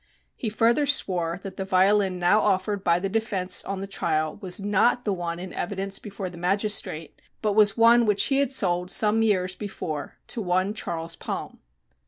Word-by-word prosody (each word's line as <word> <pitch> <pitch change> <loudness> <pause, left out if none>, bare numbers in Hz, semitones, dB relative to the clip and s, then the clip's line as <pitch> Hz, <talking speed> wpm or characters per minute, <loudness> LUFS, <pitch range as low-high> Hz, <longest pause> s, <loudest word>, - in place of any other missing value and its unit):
He 225 - -4
further 235 +7 +2
swore 180 -10 +1
that 195 -2 -8
the 190 - -2
violin 190 0 +2
now 180 +4 +3
offered 195 0 0
by 170 -1 +2
the 195 - -2
defense 195 -3 -1
on 195 -1 -4
the - - -4
trial 155 -5 -1
was 185 -1 +1
not 205 +5 +1
the 205 - 0
one 170 -2 -4
in 185 +1 -8
evidence 195 +1 -4
before 200 -2 -7
the 175 -1 -10
magistrate, 190 -4 -1 0.2
but 210 -1 +1
was 210 0 +4
one 230 0 +5
which 210 -1 +3
he 270 - +1
had 280 -2 +1
sold 180 -7 +1
some 215 +3 +3
years 185 -4 +1
before 165 -7 -6
to 235 - -3
one 185 +1 0
Charles 165 -5 -4
Palm. - - -6
195 Hz, 185 wpm, -25 LUFS, 180-210 Hz, 0.2 s, one